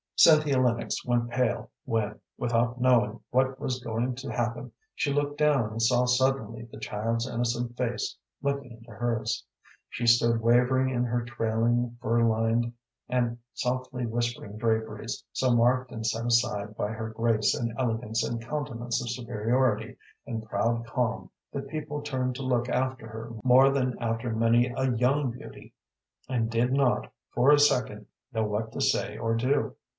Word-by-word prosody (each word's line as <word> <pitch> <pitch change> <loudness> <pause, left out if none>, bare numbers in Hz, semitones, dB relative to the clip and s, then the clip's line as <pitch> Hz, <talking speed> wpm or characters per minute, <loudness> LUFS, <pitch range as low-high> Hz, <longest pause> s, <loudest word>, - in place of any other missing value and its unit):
Cynthia 150 -4 +6
Lennox 120 -2 0
went 120 -1 0
pale 125 -1 -1
when, 105 -2 -1 0.2
without 120 +1 0
knowing 120 -4 +3
what 130 +1 +1
was 130 -3 -2
going 120 +2 -1
to 135 +2 -6
happen, 120 0 -2 0.2
she 140 - -1
looked 145 0 -1
down 140 -8 +3
and 115 +1 -4
saw 125 +2 +3
suddenly 125 -3 +1
the - - -10
child's 115 +3 -2
innocent 120 0 -2
face 125 -1 -2 0.3
looking 140 -2 -2
into 115 0 -13
hers. 115 +1 -2 0.5
She 120 - -3
stood 115 -1 +4
wavering 125 +3 +3
in 125 0 +1
her 120 0 -1
trailing, 120 +1 0
fur 115 -1 +2
lined, 115 +1 +2 0.4
and 120 -2 0
softly 125 +1 -2
whispering 120 -2 -3
draperies, 110 0 -2
so 125 -2 +2
marked 125 +2 +3
and 110 -1 -5
set 115 +1 -1
aside 115 -3 +1
by 105 - -2
her 110 0 -4
grace 110 -1 +1
and 115 -1 -2
elegance 115 -3 -1
and 115 -1 -3
countenance 120 -3 -3
of 120 - -4
superiority 120 0 0 0.3
and 110 -1 -4
proud 115 +3 0
calm 120 0 -2 0.2
that 140 0 -5
people 150 0 -4
turned 130 -3 -2
to 135 - -5
look 125 -1 0
after 130 -3 -1
her 110 +1 -7
more 130 +2 +6
than 130 -3 0
after 115 0 -2
many 115 +2 +4
a 130 -1 +1
young 130 +3 +2
beauty, 120 - -11 0.6
and 115 -3 0
did 120 +2 +1
not, 135 -3 +1 0.2
for 125 +4 +4
a 145 - +6
second, 125 -7 +2 0.3
know 110 -3 0
what 110 +1 -2
to - - -4
say 105 +1 +1
or 115 0 0
do. 130 +5 0
120 Hz, 160 wpm, -28 LUFS, 115-130 Hz, 0.6 s, Cynthia